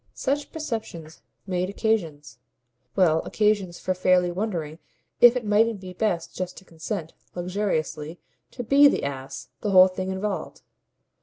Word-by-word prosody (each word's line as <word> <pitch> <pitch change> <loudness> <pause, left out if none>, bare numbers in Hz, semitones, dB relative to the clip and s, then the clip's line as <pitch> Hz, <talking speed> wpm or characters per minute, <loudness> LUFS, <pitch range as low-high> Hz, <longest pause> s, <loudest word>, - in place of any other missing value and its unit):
Such 285 +2 -2
perceptions 220 - -6 0.2
made 185 -1 -1
occasions 160 - -2 0.6
well, 165 -5 +4
occasions 205 -5 0
for 185 - -1
fairly 180 -1 +2
wondering 175 -5 -4 0.4
if 240 0 +8
it 245 -3 -2
mightn't 215 +1 +2
be 185 -1 -9
best 180 -3 -2
just 180 -1 -5
to 190 - -13
consent, 165 0 -6 0.2
luxuriously, 175 -4 -3 0.3
to 245 - -7
BE 280 +4 +6
the - - +1
ass 135 -1 -6
the 210 - -2
whole 185 -1 +8
thing 185 0 -4
involved. 195 +2 -4
185 Hz, 140 wpm, -25 LUFS, 170-215 Hz, 0.6 s, if